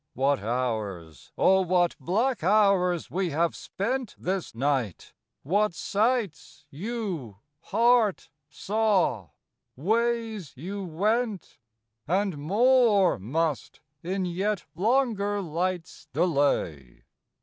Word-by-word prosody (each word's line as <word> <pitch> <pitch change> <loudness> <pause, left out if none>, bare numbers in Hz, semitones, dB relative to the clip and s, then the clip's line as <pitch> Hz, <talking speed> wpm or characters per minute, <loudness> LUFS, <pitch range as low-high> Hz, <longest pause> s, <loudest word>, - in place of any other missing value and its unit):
What 135 +1 +2
hours, 105 - -4
O 190 0 +4
what 180 -1 +2
black 225 - 0
hoiirs 185 -2 +2
we 185 0 -1
have 165 +3 0
spent 245 +4 -3
This 185 -7 -3
night! 130 - -1 0.3
what 200 +5 +1
sights 210 - -1
you, 175 - -5 0.2
heart, 225 +3 +2 0.2
saw; 190 - 0 0.5
ways 225 - -1
you 195 +9 -6
went! 205 - -1 0.5
And 185 -2 0
more 210 - +3
must, 150 - -2 0.2
in 185 +2 -2
yet 190 +3 -2
longer 205 0 +1
light's 180 0 -3
delay. 140 - 0
185 Hz, 95 wpm, -27 LUFS, 145-215 Hz, 0.5 s, O